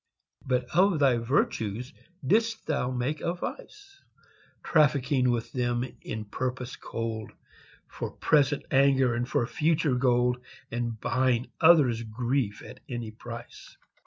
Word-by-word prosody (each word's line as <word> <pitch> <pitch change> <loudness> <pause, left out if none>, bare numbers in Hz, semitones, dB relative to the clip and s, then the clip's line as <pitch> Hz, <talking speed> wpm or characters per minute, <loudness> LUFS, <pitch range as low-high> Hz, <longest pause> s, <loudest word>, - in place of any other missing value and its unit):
But 125 -1 0
of 185 -1 +4
thy 135 -4 +4
virtues 115 -1 -1 0.3
didst 225 - +1
thou 145 -5 0
make 130 +4 -2
a 170 +1 -1
vice, 395 - -8 0.6
Trafficking 140 -4 +3
with 115 -1 -1
them 120 -1 0 0.2
in 110 - -5
a - - -8
purpose 125 +3 -4
cold, 115 -1 -5 0.5
For - - -5
present 145 -1 +2
anger, 135 -2 +4
and 120 +1 -2
for 120 - +1
future 150 +2 +1
gold 125 -1 +2 0.3
And 120 -2 -3
buying 130 +1 0
others' 150 -9 +6
grief 115 0 -2
at - - -11
any 120 -3 -4
price. 115 +2 -10
125 Hz, 130 wpm, -28 LUFS, 120-145 Hz, 0.6 s, others